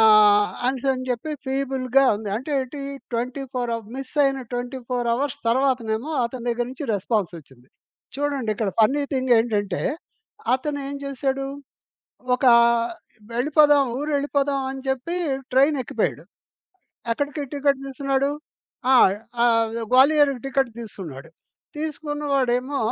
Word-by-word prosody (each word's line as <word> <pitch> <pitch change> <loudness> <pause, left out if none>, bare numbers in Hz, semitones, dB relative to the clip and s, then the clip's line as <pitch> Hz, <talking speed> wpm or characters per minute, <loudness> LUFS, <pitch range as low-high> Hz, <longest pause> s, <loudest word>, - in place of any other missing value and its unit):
ఆహ్, 210 -1 +6 0.2
అనేసనీ 260 0 0
చెప్పి 250 +6 -2 0.2
ఫీబుల్‌గా 265 0 +1
ఉంది. 210 -1 -6
అంటే 260 +6 -6
ఏంటి, 265 +2 -6 0.3
24 250 +1 -3
అవ 230 - -6 0.2
మిస్ 270 -1 -7
అయిన 270 -1 +1
24 245 0 -3
అవర్స్ 280 +3 -2
తర్వాతనేమో 250 0 +1
అతని 245 0 -5
దగ్గర 240 0 0
నుంచి 270 +2 -6
రెస్పాన్సొచ్చింది 170 - -3 0.5
చూడండి 280 -5 -1
ఇక్కడ 205 -2 -1
ఫన్నీ 275 +7 +3
థింగ్ 260 -1 +1
ఏంటంటే, 205 -5 -1 0.7
అతను 285 +2 -3
ఏం 280 - -5
జేసాడు, 270 0 -2 0.9
ఒకా 250 -2 +5 0.8
వెళ్ళిపోదాం 290 +2 +4
ఊరు 300 +1 -2
ఎళ్ళిపోదాం 280 -1 0
అని 265 0 -6
జెప్పి 265 +7 -1 0.4
ట్రైన్ 280 +3 +4
ఎక్కిపోయాడు. - - -2 0.9
ఎక్కడికి 285 +3 -2
టికెట్ 280 -1 +1
తీసుకున్నాడు. 275 0 0 0.6
ఆ! - - +7 0.5
ఆ - - +6 0.5
గ్వాలియర్‌కి 275 0 +5
టికెట్ 270 -2 +1
తీసుకున్నాడు. 165 - -9 0.5
తీసుకున్న 295 -1 -4
వాడేమో 260 +1 +1
265 Hz, 115 wpm, -23 LUFS, 235-280 Hz, 0.9 s, ఆ